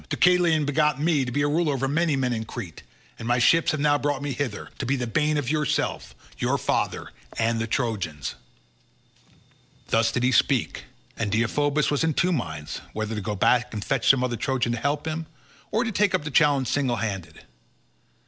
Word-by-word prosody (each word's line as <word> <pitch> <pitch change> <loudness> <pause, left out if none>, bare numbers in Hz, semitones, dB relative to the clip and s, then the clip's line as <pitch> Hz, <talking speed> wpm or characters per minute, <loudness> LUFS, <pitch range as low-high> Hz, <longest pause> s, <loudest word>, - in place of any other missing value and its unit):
Deucalion 175 -4 +3
begot 150 0 +1
me 155 -2 +2
to 120 - -4
be 145 +3 0
a - - +2
ruler 150 -1 +1
over 135 0 -1
many 155 +2 +1
men 130 -2 0
in 110 -1 -2
Crete, 105 -6 -8 0.4
and 115 - -6
my 120 +1 +2
ships 165 +7 +4
have 155 - 0
now 145 0 +3
brought 145 -1 -1
me 145 - -2
hither, 125 -5 -4
to 135 - -2
be 135 - +2
the 125 -2 -2
bane 150 +5 +1
of 140 -2 -1
yourself, 150 -2 -1 0.2
your - - +1
father, - - -1 0.3
and 115 0 +1
the 115 - -2
Trojans." 100 - -2 1.6
Thus 115 0 +3
did 120 - -1
he 125 - +3
speak, - - +1 0.3
and 110 -3 -2
Deiphobus 145 +7 +1
was 145 +2 +1
in 160 -3 +1
two 180 - +2
minds, 80 - -4
whether 110 +1 -3
to 105 - -3
go 105 +1 -3
back 120 +4 +2
and 105 - -4
fetch 135 -5 +1
some 130 -2 +5
other 120 -2 -1
Trojan 125 0 0
to 120 - -2
help 145 +3 -1
him, 160 0 -3 0.4
or 220 +3 +1
to 225 - -2
take 205 -1 +2
up - - -1
the 150 - -5
challenge 140 -2 +3
single 135 -1 0
handed. 95 -8 -5
135 Hz, 200 wpm, -25 LUFS, 115-150 Hz, 1.6 s, some